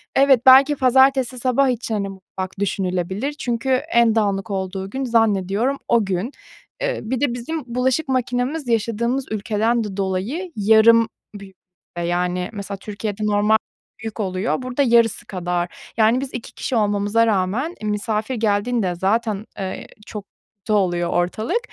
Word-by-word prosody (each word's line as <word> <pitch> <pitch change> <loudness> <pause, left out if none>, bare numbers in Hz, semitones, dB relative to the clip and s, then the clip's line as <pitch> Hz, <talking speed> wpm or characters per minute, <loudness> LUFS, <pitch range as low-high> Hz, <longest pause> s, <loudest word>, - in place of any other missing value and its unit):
Evet, 270 -3 +4
belki 270 +3 +7
pazartesi 265 -1 +3
sabah 260 +2 +2
için, 235 -2 -2
hani, 200 -1 -2
mutfak 190 0 -8
düşünülebilir 190 +5 -2
çünkü 245 -3 -3
en 245 -4 +3
dağınık 205 -1 0
olduğu 190 0 -3
gün 265 +5 -4
zannediyorum 225 +2 +1
o 230 -3 +3
gün. 195 +7 -2 0.5
Iıı, - - -1
bir 260 - -1
de 285 -5 +1
bizim 285 +6 -4
bulaşık 260 +4 +1
makinemiz 255 +3 -1
yaşadığımız 235 +3 0
ülkeden 220 +2 0
de 205 -2 -6
dolayı 200 - -2
yarım 220 +2 +5 0.3
büyük 195 -1 -11 0.5
yani 180 +1 -1
mesela 200 -1 -6
Türkiye'de 210 +1 -5
normal 210 +1 +3 0.5
büyük 225 0 -6
oluyor, 195 +5 -1
burada 255 +2 -2
yarısı 235 -3 +3
kadar 175 -2 -4
yani 225 +3 +3
biz 275 -1 -6
2 240 - -7
kişi 260 - -3
olmamıza 205 +1 +2
rağmen, 220 - 0
e, - - -5
misafir 215 +3 -2
geldiğinde 210 -2 0
zaten, 210 +3 0
eee, 190 -1 -5 0.2
çok 210 -2 -7 0.3
kötü 215 +2 -3
oluyor 175 -4 +1
ortalık, 215 - 0
220 Hz, 145 wpm, -21 LUFS, 195-250 Hz, 0.5 s, belki